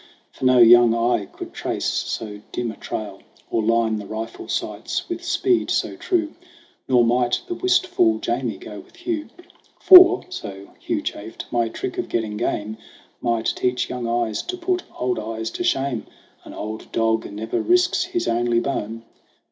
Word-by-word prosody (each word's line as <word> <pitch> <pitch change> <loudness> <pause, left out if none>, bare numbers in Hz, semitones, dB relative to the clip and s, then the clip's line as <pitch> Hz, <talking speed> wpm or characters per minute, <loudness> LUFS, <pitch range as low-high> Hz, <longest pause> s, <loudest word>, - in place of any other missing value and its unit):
For - - -6
no 130 0 +5
young 120 0 +7
eye 115 -3 +1
could - - -10
trace - - -3
so 105 -2 -3
dim 120 -2 -2
a - - -11
trail, 100 -3 -6 0.3
Or 115 - +1
line 115 0 +2
the 100 - -8
rifle 110 +2 -6
sights - - -3
with 345 0 -5
speed 350 +1 +1
so - - 0
true. 330 -4 -1 0.5
Nor 125 -2 +4
might 120 +1 +1
the 360 - -4
wistful 360 -1 +2
Jamie - - -2
go - - -9
with - - -16
Hugh; 320 -3 -4 0.5
"For," 370 0 +9
so 100 - -8
Hugh - - -2
chaffed, 110 +2 -6
"my 120 -1 +1
trick 375 - -5
of 360 - -3
getting 110 -2 -2
game 105 +1 -2 0.4
Might 115 -2 0
teach 125 0 -1
young 125 -2 -3
eyes 115 -2 0
to 365 - -5
put 360 +1 -1 0.2
old 125 -2 -1
eyes 110 +1 -4
to - - -4
shame. 135 -5 0 0.4
An - - -10
old 110 +1 -6
dog 115 -1 0
never 110 +2 -3
risks 360 0 +2
his 355 -1 -2
only 120 0 +2
bone." 115 -3 -3
120 Hz, 165 wpm, -22 LUFS, -, 0.5 s, For